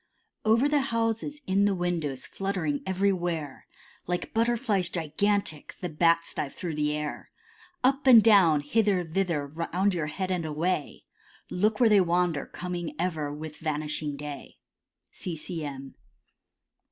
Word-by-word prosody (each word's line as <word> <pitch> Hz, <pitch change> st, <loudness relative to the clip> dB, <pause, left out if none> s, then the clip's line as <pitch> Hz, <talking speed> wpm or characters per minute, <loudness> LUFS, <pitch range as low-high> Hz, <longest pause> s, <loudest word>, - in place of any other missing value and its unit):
Over 230 Hz, +5 st, +4 dB
the 290 Hz, -1 st, +2 dB
houses, 230 Hz, +3 st, -1 dB
in 195 Hz, +2 st, +2 dB
the 200 Hz, -1 st, +2 dB
windows, 165 Hz, -7 st, -2 dB
fluttering 185 Hz, -7 st, -2 dB
everywhere, 175 Hz, -7 st, -1 dB, 0.4 s
Like 175 Hz, 0 st, -3 dB
Butterflies 225 Hz, -5 st, +1 dB
gigantic, 170 Hz, 0 st, -1 dB
the 180 Hz, -, -3 dB
Bats 165 Hz, +1 st, +2 dB
dive 140 Hz, -, -3 dB
through 175 Hz, -3 st, -4 dB
the 150 Hz, 0 st, 0 dB
air; 150 Hz, 0 st, -5 dB, 0.5 s
Up 270 Hz, +2 st, +2 dB
and 235 Hz, -4 st, +9 dB
down, 185 Hz, -9 st, +6 dB
hither, 195 Hz, +4 st, +2 dB
thither, 170 Hz, -3 st, -1 dB
round 170 Hz, +6 st, -1 dB
your 165 Hz, -4 st, -2 dB
head 185 Hz, +5 st, -3 dB
and 180 Hz, -2 st, 0 dB
away, 155 Hz, 0 st, -2 dB, 0.5 s
Look 210 Hz, +3 st, +1 dB
where 240 Hz, -, +6 dB
they 210 Hz, -3 st, +6 dB
wander, 175 Hz, -4 st, +1 dB
coming 175 Hz, -4 st, -5 dB
ever 160 Hz, -4 st, -2 dB
with 150 Hz, +1 st, -7 dB
vanishing 150 Hz, -1 st, -3 dB
day. 145 Hz, -1 st, -8 dB, 0.5 s
C. 175 Hz, -, -5 dB
C. 160 Hz, +1 st, -5 dB
M. 135 Hz, -2 st, -7 dB
175 Hz, 140 wpm, -27 LUFS, 150-200 Hz, 0.5 s, and